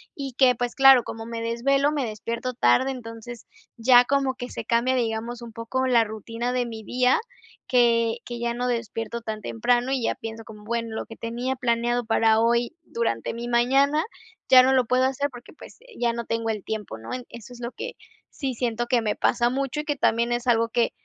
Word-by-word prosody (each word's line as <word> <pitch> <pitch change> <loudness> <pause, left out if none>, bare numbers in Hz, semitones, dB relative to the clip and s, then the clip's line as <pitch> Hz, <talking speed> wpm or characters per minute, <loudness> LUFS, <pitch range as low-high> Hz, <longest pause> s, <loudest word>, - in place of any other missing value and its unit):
y 275 -2 -5
que, 250 0 +4
pues, 245 +1 -2
claro, 270 -2 +7
como 225 +1 -7
me 230 -1 -5
desvelo, 275 +5 +1
me 290 -4 -1
despierto 230 +3 -4
tarde, 120 - +3
entonces 235 -2 -8 0.3
ya 245 +1 +6
como 275 0 +1
que 250 -1 -7
se - - -6
cambia, 240 +3 +2
digamos, 235 0 -2
un 230 - -10
poco 230 +4 -2
la 240 -3 +4
rutina 230 +3 -4
de 250 -1 0
mi 225 -2 -7
día 250 +3 +2 0.5
que 235 -2 +3
que 240 -1 -6
ya 235 0 -1
no 250 +1 -2
despierto 230 -1 -3
tan 215 -1 -5
temprano 240 - 0
y 270 -2 0
ya - - 0
pienso 225 0 -7
como: 210 -1 -12
"Bueno, 230 0 -3
lo - - -4
que 225 - -11
tenía 240 +4 -3
planeado 240 -1 0
para 225 0 +3
hoy 235 +4 +1
durante 230 - -2
mi 235 +1 -5
mañana 270 +6 +3 0.5
ya 255 -1 +9
no 265 +1 +3
lo 260 -1 +4
puedo 255 +2 +2
hacer, 280 +2 0
porque, 245 -2 -13
pues, - - -14 0.2
ya 240 -1 +1
no 235 0 -5
tengo 230 0 -2
el 215 -3 -3
tiempo", 210 - -5
¿no? 110 - -10 0.2
Eso 235 +1 -11
es 245 - -12
lo 235 +1 -4
que - - -6 0.4
sí 270 -3 -4
siento 240 0 -2
que 240 -1 +2
me 210 -2 -1
pasa 240 0 +2
mucho 275 +2 -2
y - - -13
que 290 - -1
también 235 -2 +1
es 240 +1 -3
algo 230 -1 +3
que 235 0 +1
235 Hz, 210 wpm, -25 LUFS, 230-255 Hz, 0.5 s, ya